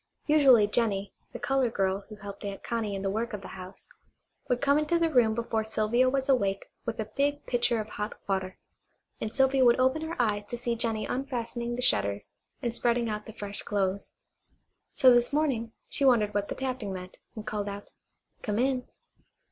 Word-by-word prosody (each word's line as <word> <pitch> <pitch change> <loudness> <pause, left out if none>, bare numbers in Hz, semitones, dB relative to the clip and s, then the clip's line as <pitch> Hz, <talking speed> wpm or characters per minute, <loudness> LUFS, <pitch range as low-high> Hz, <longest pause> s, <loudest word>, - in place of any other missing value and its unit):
Usually 275 -8 +6
Jennie, 205 -2 0 0.2
the - - -6
colored 270 -4 0
girl 195 0 0
who 215 - -8
helped 200 -1 -9
Aunt 200 -1 -5
Connie 225 -4 -2
in 195 - -4
the 195 - 0
work 225 +3 -2
of 210 - -4
the - - -8
house, 185 0 -10 0.6
would 245 - +2
come 280 +2 +3
into 305 +3 +1
the 335 -1 +1
room 225 -4 +4
before 225 -1 -1
Sylvia 220 +3 +2
was 270 0 -1
awake 200 -8 +1 0.2
with 230 0 -3
a 220 0 -4
big 285 +1 0
pitcher 240 -1 +2
of 215 - -4
hot 210 0 -5
water, 190 -1 -2 0.6
and 215 - -3
Sylvia 265 +1 +3
would 240 0 +5
open 260 +4 +3
her 320 -1 -5
eyes 210 -3 +1
to 240 - -5
see 235 -1 -1
Jennie 225 -2 -1
unfastening 240 -2 -3
the 250 - -2
shutters 100 - +1 0.3
and 235 -2 0
spreading 235 -1 +1
out 210 0 -4
the 220 - -8
fresh 205 -2 -6
clothes. 200 -1 -2 0.8
So 255 -1 +7
this 240 +2 +3
morning 270 -7 0 0.2
she 280 - -2
wondered 225 -6 +4
what 205 0 0
the - - -3
tapping 255 -6 -3
meant, 185 -1 -8 0.2
and 215 -1 -7
called 210 -1 -3
out: 200 0 -8 0.5
"Come 210 -3 -2
in." 255 +1 +1
230 Hz, 195 wpm, -28 LUFS, 205-255 Hz, 0.8 s, So